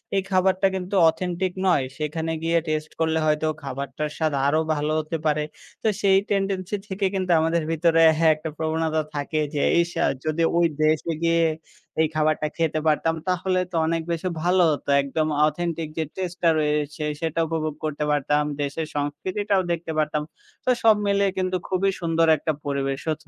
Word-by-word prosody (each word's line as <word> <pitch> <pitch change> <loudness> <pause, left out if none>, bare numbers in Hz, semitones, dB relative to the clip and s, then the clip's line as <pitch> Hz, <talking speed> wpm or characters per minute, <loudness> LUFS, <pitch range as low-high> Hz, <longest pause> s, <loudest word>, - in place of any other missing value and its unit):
এই 195 - +3
খাবারটা 190 +1 +3
কিন্তু 190 +1 -3
অথেন্টিক 180 +2 -2
নয়। 150 -7 +3
সেখানে 160 +2 -2
গিয়ে 165 +1 +2
টেস্ট 155 0 -2
করলে 160 0 +1
হয়তো, 155 0 +1 0.2
খাবারটার 140 +2 -4
স্বাদ 155 -2 0
আরো 155 +2 +3 0.2
ভালো 150 +1 -1
হতে 155 +1 -3
পারে। 150 0 +2 0.4
তো, - - +2
সেই 195 -1 +5
টেনডেন্সি 195 -1 -1
থেকে 195 +1 -2
কিন্তু 185 -1 -1
আমাদের 165 +1 +1
ভিতরে 165 0 +3 0.2
হ্যাঁ 160 0 +5
একটা 155 +1 -6
প্রবণতা 160 0 0
থাকে 145 +2 -2
যে, 145 - 0 0.2
ইস! 170 0 -3
আ - - +4 0.2
যদি 155 +1 0 0.2
ওই 175 - +4 0.2
দেশে 155 +2 +2
গিয়ে 165 0 +3 0.6
এই 160 - +3
খাবারটা 155 0 +1
খেতে 160 -1 0
পারতাম, 165 +2 +2
তাহলে 185 0 +1
তো - - -6
অনেক 165 0 0
বেশি 170 +2 -1
ভালো 180 +1 +3
হতো। 145 - -4
একদম 145 +3 -1 0.2
অথেন্টিক 165 0 -3
যে 160 - +1
টেস্টটা 180 -2 0
রয়েছে 150 0 -1 0.2
সেটা 165 0 -1
উপভোগ 155 -2 -2
করতে 150 -1 -2
পারতাম। 145 +1 +1 0.2
দেশের 145 +3 -3
সংস্কৃতিটাও 185 +8 -1
দেখতে 170 -1 -3
পারতাম। 150 -1 0 0.4
তো - - +1
সব 220 -1 +7
মিলিয়ে 200 -1 +2
কিন্তু 185 0 0
খুবই 190 +1 +1
সুন্দর 165 -1 +2
একটা 155 - -1
পরিবেশ 140 -1 -1
হতো। 150 - -6
160 Hz, 170 wpm, -24 LUFS, 150-180 Hz, 0.6 s, সব